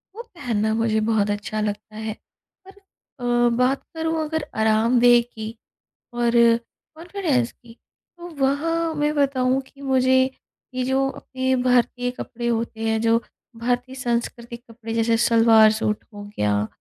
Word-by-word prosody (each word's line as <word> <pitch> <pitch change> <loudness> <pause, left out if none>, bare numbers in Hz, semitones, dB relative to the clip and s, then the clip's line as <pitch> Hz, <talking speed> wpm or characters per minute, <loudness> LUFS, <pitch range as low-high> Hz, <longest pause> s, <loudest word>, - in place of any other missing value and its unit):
वो 465 - -6
पहनना 235 - -2
मुझे 225 -1 +1
बहुत 210 -2 +2
अच्छा 210 +1 -3
लगता 210 +1 -4
है 220 0 -4 0.5
पर - - -11 0.5
अ, 240 0 +3
बात 255 +2 +1
करूँ 320 0 -1
अगर 310 -1 -3 0.2
आरामदेह 235 +2 +4
की 220 -1 -6 0.6
और 240 0 0 0.6
कॉन्फिडेंस 325 -8 -1
की, 235 -1 -18 0.4
तो 345 0 -9 0.2
वहाँ 325 +4 0
मैं 295 0 0
बताऊँ 265 -2 +1
कि 280 - -18
मुझे, 260 -1 +3 0.5
ये 255 0 -1
जो 265 +1 +1
अपने 260 -1 -2
भारतीय 245 0 +1
कपड़े 240 -1 -6
होते 230 -1 -2
हैं 220 0 +1
जो 230 0 +3 0.5
भारतीय 245 +2 -1
सांस्कृतिक 235 -1 -3
कपड़े 225 0 -7
जैसे 230 0 +2
सलवार-सूट 220 -2 +4
हो 205 0 -8
गया, 105 0 +1
240 Hz, 135 wpm, -23 LUFS, 225-265 Hz, 0.6 s, आरामदेह